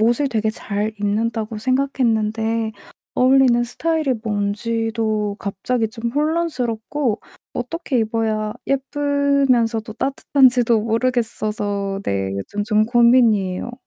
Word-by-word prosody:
옷을 240 +5 +2
되게 220 -3 0
저 220 - -9
잘 210 +1 -2
입는다고 220 +1 -1
생각했는데 225 -4 0 0.4
어울리는 255 -2 +4
스타일이 310 +1 0
뭔지도 215 0 -1
갑자기 220 +4 -1
좀 230 +1 -4
혼란스럽고 290 -6 -1 0.3
어떻게 260 +2 -2
입어야 220 -1 -1 0.2
예쁘면서도 275 -5 +1
따뜻한지도 255 -3 +3
모르겠어서 215 -4 -1
네 95 -1 -1
요즘 205 - -4
좀 215 0 +3
고민이에요. 235 -4 +3
230 Hz, 280 characters per minute, -20 LUFS, 215-255 Hz, 0.4 s, 어울리는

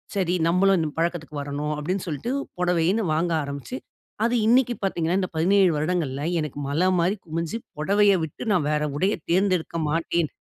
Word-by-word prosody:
"சரி. 180 -2 +1
நம்மளும் 190 +2 +4
இந்த 155 -2 -1
பழக்கத்துக்கு 165 -3 -2
வரணும்." 145 +2 -3
அப்படீன்னு 180 +6 -2
சொல்ட்டு 165 - -3 0.3
புடவைன்னு 180 +4 +2
வாங்க 165 +2 0
ஆரம்பிச்சு, 140 -3 -6 0.5
அது 240 +1 +1
இன்னைக்கு 245 0 +4
பாத்தீங்கன்னா, 175 0 0
இந்த 185 - -2
17 185 +2 +4
வருடங்கள்ல 150 -4 -1 0.2
எனக்கு 145 -1 -5
மலை 175 +6 +2
மாரி 185 +5 +1
குமிஞ்சு, 165 +7 -3 0.2
"புடவைய 200 +4 +4
விட்டு 150 - -9
நா 180 - +3
வேற 150 0 +1
உடைய 195 +6 +2 0.2
தேர்ந்தெடுக்க 185 -3 +1
மாட்டேன்." 165 0 0
170 Hz, 155 wpm, -24 LUFS, 155-190 Hz, 0.5 s, நம்மளும்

